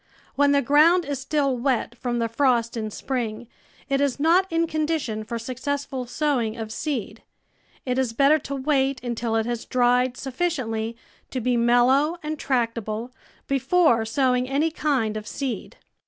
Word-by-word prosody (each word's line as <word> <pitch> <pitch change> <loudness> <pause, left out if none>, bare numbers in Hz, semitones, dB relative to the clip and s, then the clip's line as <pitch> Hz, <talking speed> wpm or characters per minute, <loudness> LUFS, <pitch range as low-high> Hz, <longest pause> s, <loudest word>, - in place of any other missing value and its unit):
When 285 0 +3
the 280 0 +3
ground 320 +6 +5
is 280 -2 -3
still 280 -4 0
wet 250 0 -1
from 240 -1 -3
the 230 -1 0
frost 235 -1 +1
in 220 -2 -3
spring 235 -1 -4 0.4
it 275 0 +1
is 280 -1 0
not 345 +5 +3
in 330 0 +2
condition 310 -8 -2
for 235 +2 -4
successful 260 +2 -4
sowing 245 -4 -1
of 220 -1 -5
seed; 230 -5 -4 0.6
it 250 0 0
is 260 -3 0
better 280 +6 +4
to 280 0 -5
wait 270 -1 +1
until 235 -2 -2
it 225 -1 +1
has 240 -1 -3
dried 250 0 +2
sufficiently 250 -6 -2 0.3
to 260 - -3
be 250 +1 +1
mellow 245 +7 +3
and 305 0 -4
tractable 230 -2 -2 0.3
before 275 -2 +3
sowing 250 +2 +1
any 295 +4 +1
kind 260 -9 0
of 210 0 -7
seed. 265 -2 -5
255 Hz, 155 wpm, -24 LUFS, 235-285 Hz, 0.6 s, ground